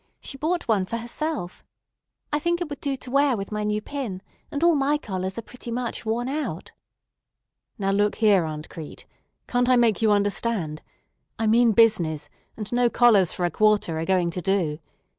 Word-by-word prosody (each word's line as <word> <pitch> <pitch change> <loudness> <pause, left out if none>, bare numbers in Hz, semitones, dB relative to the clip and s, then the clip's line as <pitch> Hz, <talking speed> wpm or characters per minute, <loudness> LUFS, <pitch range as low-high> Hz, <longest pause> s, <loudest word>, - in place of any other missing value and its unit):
She - - -7
bought 330 +5 -2
one 200 -5 +1
for 230 - -2
herself. 240 - -4 0.7
I 295 - +2
think 345 +3 0
it 350 - -3
would 285 - -5
do 280 -2 -2
to 255 -1 -9
wear 275 -2 +3
with 195 +1 -6
my 210 0 -2
new 210 0 -1
pin, 235 -10 -5 0.3
and 290 +2 -3
all 340 0 +6
my 290 0 +2
collars 190 -7 -4
are 230 - -4
pretty 245 +1 -10
much 235 -1 -3
worn 235 +3 -1
out." 295 +3 -4 1.1
"Now 195 -3 0
look 205 +1 +2
here, 205 -5 +4
Aunt 155 -1 -6
Crete! 155 -3 -9 0.4
Can't 245 0 +1
I 255 - +6
make 235 -4 +3
you 220 -1 +4
understand? 205 -5 0 0.6
I 225 - -1
mean 230 +1 +4
business, 170 -10 +3 0.3
and 215 +1 -5
no 245 0 +3
collars 220 -8 +4
for 180 - -2
a 175 - 0
quarter 210 -5 +2
are 165 - -2
going 180 -2 +1
to 180 - -4
do. 175 -6 0
220 Hz, 190 wpm, -24 LUFS, 190-250 Hz, 1.1 s, all